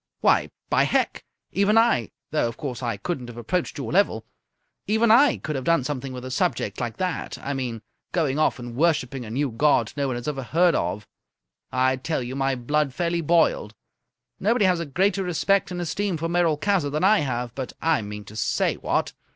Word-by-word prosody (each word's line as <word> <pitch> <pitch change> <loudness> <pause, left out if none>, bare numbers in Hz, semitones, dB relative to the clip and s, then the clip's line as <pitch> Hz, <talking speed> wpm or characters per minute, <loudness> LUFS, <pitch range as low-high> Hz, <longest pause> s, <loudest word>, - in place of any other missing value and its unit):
Why, - - +3 0.2
by - - +3
Hec, - - 0 0.3
even 200 +3 +3
I 225 - +3 0.2
though, 150 -5 +1
of 115 - -6
course, 130 -4 -5
I 120 -2 -2
couldn't 140 -9 -4
have 120 -1 -10
approached 165 +11 -2
your 135 -6 -4
level 155 - +2 0.6
even 220 +2 +3
I 255 +3 +6
could 155 - -4
have 130 - -3
done 165 -1 +2
something 135 -1 -4
with 125 0 -7
a 130 - -6
subject 115 -5 -1
like 120 -2 -3
that. 185 -2 -3
I 140 - -3
mean, 125 -5 -4 0.3
going 155 -5 0
off 155 - +2
and 120 -1 -8
worshipping 135 -5 +1
a - - -8
new 135 +3 -1
god 120 -2 +2
no 140 -1 0
one 130 - -2
has 120 +2 -6
ever 140 -3 -2
heard 170 +7 +3
of. 105 -5 -2 0.6
I 130 +1 +2
tell 135 0 -2
you, 125 +2 -5
my 135 0 0
blood 140 +2 0
fairly 170 -1 0
boiled. 160 -9 +2 0.6
Nobody 220 +1 +2
has 180 -2 +3
a 170 - -4
greater 190 +6 +1
respect 180 +2 +1
and 180 -1 -4
esteem 175 +2 -1
for 165 +2 -2
Merolchazzar 170 0 +1
than 150 +4 -2
I 210 +3 +5
have, 125 -4 -2
but 130 -1 -5
I 160 -5 +2
mean 105 0 -7
to 105 - -12
say, 110 - 0
what! - - -1
145 Hz, 200 wpm, -24 LUFS, 125-175 Hz, 0.6 s, I